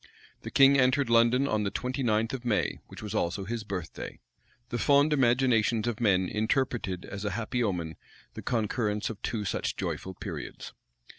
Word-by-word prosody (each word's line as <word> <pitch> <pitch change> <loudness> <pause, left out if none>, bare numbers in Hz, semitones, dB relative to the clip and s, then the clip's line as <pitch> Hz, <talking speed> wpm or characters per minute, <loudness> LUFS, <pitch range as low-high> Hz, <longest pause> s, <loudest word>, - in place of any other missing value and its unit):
The - - -6
king 140 0 +6
entered 130 -1 +3
London 120 +4 +4
on 110 -5 +1
the 100 - 0
twenty 125 +5 -3
ninth 115 -1 +1
of 130 -2 -4
May, 115 -4 0
which - - -11
was 105 - -5
also 90 +3 -1
his 115 +2 -3
birthday. 95 -6 -6 0.5
The 120 - -2
fond 145 +1 +4
imaginations 120 -4 +3
of 115 -2 -2
men 95 -4 +3
interpreted 110 -4 -1
as 100 +1 -7
a 105 - 0
happy 120 +2 -1
omen 85 -7 -2 0.4
the - - -7
concurrence 110 -3 -1
of 105 - -10
two 110 -3 -2
such 95 - -2
joyful 95 0 -4
periods. - - -7
115 Hz, 170 wpm, -29 LUFS, 105-125 Hz, 0.5 s, king